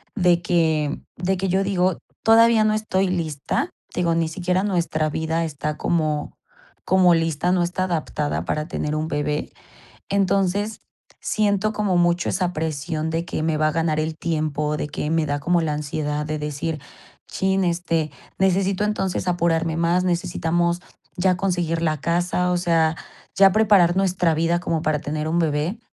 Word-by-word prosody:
de 175 -4 +3
que, 160 -4 +1 0.2
de 180 +3 0
que 190 +1 -1
yo 190 +2 +2
digo 185 -2 +1 0.3
todavía 225 0 +6
no 215 0 +2
estoy 205 -3 0
lista. 165 -2 -2 0.3
Digo, 170 -2 +1
ni 165 -1 +1
siquiera 180 +2 -1
nuestra 170 -5 0
vida 160 +2 -1
está 150 -1 -4
como 155 -3 -1 0.5
como 185 -2 +5
lista, 165 +1 0
no 180 -1 +2
está 180 +2 -1
adaptada 155 -4 -2
para 150 0 -2
tener 150 -2 -2
un 155 +1 -1
bebé. 150 0 -2 0.6
Entonces, 200 +2 0 0.4
siento 215 0 +1
como 205 -4 0
mucho 175 0 +2
esa 180 -1 -1
presión 155 0 -3
de 165 +1 -2
que 165 - -3
me 160 -1 0
va 155 0 +2
a - - -1
ganar 160 -1 0
el 155 +1 -2
tiempo, 150 -2 -1
de 150 - -3
que 150 - -3
me 165 -1 +2
da 145 0 -1
como 170 +4 +1
la 155 -2 -1
ansiedad 150 0 -3
de 155 0 -3
decir: 150 +1 -3 0.5
"Chin, 190 0 0
este, 170 -3 0 0.3
necesito 190 +1 +2
entonces 195 -3 -1
apurarme 165 -2 +1
más, 170 +2 +2
necesitamos 175 0 0 0.4
ya 180 0 +2
conseguir 175 -4 -1
la 155 -2 0
casa, 175 +2 0
o 180 - +2
sea, 165 -2 +2 0.4
ya 195 0 +7
preparar 200 -5 +4
nuestra 180 -3 +2
vida 165 +2 +1
como 165 -2 -1
para 155 -1 +1
tener 150 +1 -3
un 165 +2 +1
bebé". 160 +6 -1
170 Hz, 165 wpm, -22 LUFS, 155-185 Hz, 0.6 s, ya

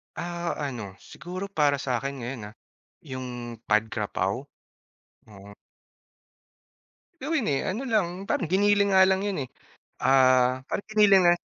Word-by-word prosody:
Ah, 170 0 -3
ano, 120 -9 -4
siguro 185 +3 -7
para 145 -7 +1
sa'kin 135 +1 -2
ngayon, 115 -4 -6
ah, - - -24 0.4
yung 125 -6 -7
Pad 110 +1 +2
Kra 105 -2 -4
Pao, 95 +8 -1 0.9
oo. 100 0 -13 1.7
Gawin, 305 -7 0
eh, 135 - +1
ano 225 +8 -3
lang, 210 -6 +3 0.2
parang 170 - 0
giniling 205 +1 +3
nga - - +8
lang 190 0 +2
'yon 200 -2 -2
eh, - - -16 0.6
ah, 130 -1 +4
parang 200 - -3
giniling 205 -3 +6
na 175 - +7
140 Hz, 135 wpm, -26 LUFS, 120-190 Hz, 1.7 s, nga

